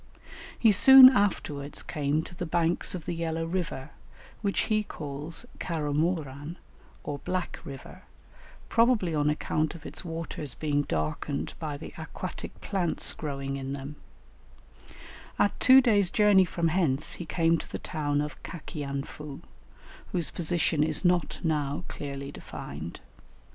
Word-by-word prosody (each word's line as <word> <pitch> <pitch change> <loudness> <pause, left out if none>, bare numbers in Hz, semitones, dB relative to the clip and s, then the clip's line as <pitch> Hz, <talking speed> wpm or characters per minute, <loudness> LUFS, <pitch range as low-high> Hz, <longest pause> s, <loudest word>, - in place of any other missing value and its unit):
He 225 - +5
soon 260 +6 +11
afterwards 155 - -1
came 150 +1 -1
to - - -10
the 175 -1 -5
banks 170 +2 +1
of 175 - -7
the - - -2
Yellow 165 -1 -2
River, 165 -6 -3 0.5
which 200 -2 +1
he 215 -1 +1
calls 155 +1 -5
Caramoran 155 -1 -2 0.5
or 145 -1 -4
Black 180 +3 -3
River, 135 -1 -10 0.7
probably 230 -7 +3
on 150 -1 +2
account 155 +1 -1
of 165 - -12
its - - -7
waters 165 -5 -5
being 145 -2 0
darkened 80 - -2
by 150 -3 -4
the 150 - -9
aquatic 170 +3 -7
plants 185 -5 0
growing 140 -2 -4
in 135 0 -4
them; 140 +1 -6 1.4
at 205 - +1
two 260 +1 +8
days' 205 -7 +3
journey 205 -2 +5
from 170 -1 0
hence 155 -5 +1
he 175 - -6
came 165 0 +2
to - - -9
the - - -3
town 145 -3 -1
of 150 0 -5
Cacianfu, 145 -3 -6 0.7
whose 170 -4 -1
position 165 -2 +1
is 155 +3 -1
not 175 -1 +2
now 150 0 0
clearly 140 -1 -6
defined. 75 +5 -8
160 Hz, 135 wpm, -28 LUFS, 145-180 Hz, 1.4 s, soon